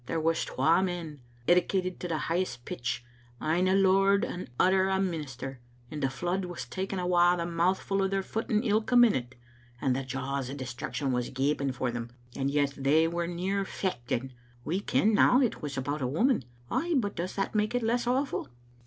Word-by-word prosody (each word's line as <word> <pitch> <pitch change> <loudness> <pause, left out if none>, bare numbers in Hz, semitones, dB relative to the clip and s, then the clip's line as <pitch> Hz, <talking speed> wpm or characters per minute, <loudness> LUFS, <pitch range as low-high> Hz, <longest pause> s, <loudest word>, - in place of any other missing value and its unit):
There 165 - -1
was 165 +1 +1
twa 165 +3 +2
men, 175 -5 -3 0.3
edicated 180 +1 +2
to 180 - -4
the 165 -2 -1
high 165 +3 0
est 120 -10 -4
pitch, 120 0 -3 0.3
ane 170 +4 +1
a 190 - +3
lord 195 +1 +4
and 180 - -5
the - - -24
other 190 +1 +4
a 190 0 +1
minister, 135 -8 -4 0.3
and 150 - -5
the 135 - +2
flood 175 +7 -2
was 175 -1 -6
taking 190 0 -4
awa 175 -1 +4
a 170 - -2
mouthful 185 +3 0
o' 195 - +2
their 195 0 -1
footing 220 +2 -1
ilka 220 +2 +1
minute, 130 - +4 0.4
and 130 -1 +1
the 135 - -2
jaws 135 0 -3
o' 135 - -5
destruction 130 +1 -3
was 125 -1 -1
gaping 140 +1 0
for 125 -1 -2
them, 120 0 -5 0.3
and 135 0 0
yet 140 -1 +1
they 150 +4 +3
were 170 +1 -2
near 185 +3 -1
fechting. 130 -9 -3 0.3
We 180 +4 0
ken 215 +1 +2
now 250 +4 +5
it 250 -5 0
was 145 -2 -5
about 145 +3 -2
a 125 - 0
woman. 170 - +2 0.3
Ay, 325 +6 0
but 205 -5 -1
does 175 +2 -4
that 195 - -1
make 215 +2 +1
it 245 - 0
less 240 +2 +1
awful?" 265 +3 0
175 Hz, 195 wpm, -29 LUFS, 135-195 Hz, 0.4 s, now